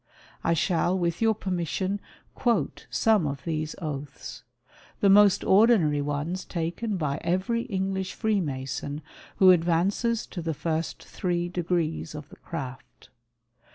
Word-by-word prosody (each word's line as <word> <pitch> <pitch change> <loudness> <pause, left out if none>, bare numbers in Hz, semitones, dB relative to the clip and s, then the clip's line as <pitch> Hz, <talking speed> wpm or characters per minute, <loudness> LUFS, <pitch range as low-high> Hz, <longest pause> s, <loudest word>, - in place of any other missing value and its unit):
I 165 - +2
shall 175 +2 +1
with 170 0 -1
your 225 -1 +4
permission 190 +1 -2 0.3
quote 225 - 0
some 215 -8 +3
of 140 -2 -4
these 155 -1 -2
oaths 150 -4 -6 0.3
— - - -26
the 200 - +5
most 205 -1 +6
ordinary 190 -8 +4
ones 145 +6 -2
taken 175 +5 -3
by 150 -3 -1
every 195 +7 0
English 190 -3 -2
Freemason 145 - -2 0.3
who 185 -1 +7
advances 180 +7 +2
to 175 - -6
tlie 160 -2 -2
first 160 +2 -2
three 175 -1 -2
degrees 170 -3 -1
of 150 0 -8
the - - -14
Craft. 130 -6 -8
175 Hz, 130 wpm, -27 LUFS, 155-195 Hz, 0.3 s, who